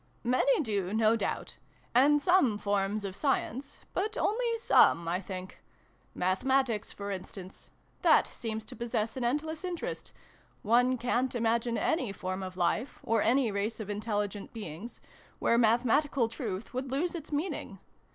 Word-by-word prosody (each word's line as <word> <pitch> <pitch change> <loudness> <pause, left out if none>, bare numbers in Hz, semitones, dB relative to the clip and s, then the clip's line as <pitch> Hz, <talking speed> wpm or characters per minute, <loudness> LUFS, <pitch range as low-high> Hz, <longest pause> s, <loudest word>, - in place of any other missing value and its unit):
" - - -37 0.2
Many - - +3
do, 205 -7 -1
no 220 0 +4
doubt. 230 - -3 0.4
And 285 +4 +5
some 350 - +4
forms 205 0 -1
of 190 -1 -5
Science; 270 -1 -2
but 420 +4 -1
only 465 +2 +1
some, 170 - +4
I 180 +3 0
think. 185 -1 -8 0.5
Mathematics, 225 +4 +1
for 200 0 -6
instance: 190 0 -8 0.3
that - - +5
seems 220 -1 -5
to - - -10
possess 230 -2 -2
an 255 - -3
endless 305 +7 -1
interest: 360 -2 -4 0.5
one 245 +4 +3
ca'n't 245 +1 0
imagine 230 0 +1
any 255 - 0
form 185 0 -4
of 185 -1 -6
Life, 185 +8 0
or 225 -1 +2
any 240 0 +3
race 200 +3 -2
of 210 -1 -4
intelligent 205 -1 -3
beings, 210 0 -7 0.4
where 235 - +2
Mathe 235 +1 +4
matical 270 0 +2
truth 225 -4 -5
would 260 +1 -3
lose 320 +6 0
its 320 -3 -7
meaning. 300 +6 -3
230 Hz, 150 wpm, -30 LUFS, 205-270 Hz, 0.5 s, And